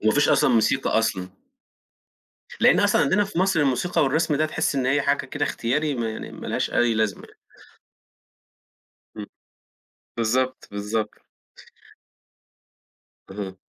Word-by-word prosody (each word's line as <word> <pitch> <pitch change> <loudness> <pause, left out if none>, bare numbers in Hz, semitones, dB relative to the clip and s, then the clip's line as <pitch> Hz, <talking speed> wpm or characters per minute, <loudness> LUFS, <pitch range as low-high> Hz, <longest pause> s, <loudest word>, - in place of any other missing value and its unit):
وما 110 - +3
فيش 145 - +2
أصلًا 135 -2 +4
موسيقى 125 +3 +2
أصلًا. 95 -5 -1 1.3
لأن - - +5
أصلًا - - +3
عندنا 195 +8 +2
في 195 -3 -6
مصر 190 -3 +2
الموسيقى 145 +6 +1
والرسم 150 +2 +1
ده 155 +2 +1
تحس 155 - -1
إن 130 -2 0
هي 140 +2 +2
حاجة 140 0 0
كده 145 +2 -2
اختياري، 145 +4 -1
ما 115 -3 -2
يعني 110 - -7
ما - - -9
لهاش - - -2
أي 120 -1 +2
لازمة 110 -1 -1
يعني. 430 - -22 1.8
إمم، - - -6 0.9
بالضبط، 130 +3 -1
بالضبط. 105 +2 -3 2.2
اهم. 95 -1 -6
130 Hz, 130 wpm, -23 LUFS, 110-150 Hz, 2.2 s, لأن